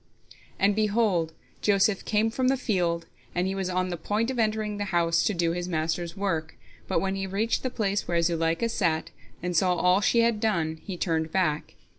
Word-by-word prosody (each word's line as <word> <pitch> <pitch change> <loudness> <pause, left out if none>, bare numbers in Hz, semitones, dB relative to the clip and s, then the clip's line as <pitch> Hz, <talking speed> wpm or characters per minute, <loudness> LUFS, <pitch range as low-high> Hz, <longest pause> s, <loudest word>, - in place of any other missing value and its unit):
And, 200 +1 +3
behold, 210 -6 +1 0.3
Joseph 200 -1 +2
came 220 +1 +2
from 255 +2 0
the 265 +1 +3
field, 175 -8 0 0.3
and 180 +1 +1
he 190 - -1
was 190 -1 -2
on 185 0 0
the 175 - -3
point 215 +8 -1
of 255 - -4
entering 215 -1 0
the 205 - -2
house 170 -3 +2
to 210 - +2
do 170 -1 +1
his 175 +1 -3
master's 165 +2 -2
work, 165 -6 -2 0.3
but - - +1
when 195 0 -1
he 195 0 -3
reached 210 +4 0
the 255 - -1
place 205 -4 -1
where 170 -1 +1
Zuleika 165 +4 +1
sat, 165 -8 0 0.3
and 180 0 -2
saw 180 +2 +3
all 180 +2 +3
she 235 +3 +3
had 230 -2 +2
done, 170 -8 0
he 190 -4 -5
turned 160 -2 -1
back. 160 -6 0
190 Hz, 200 wpm, -27 LUFS, 170-210 Hz, 0.3 s, And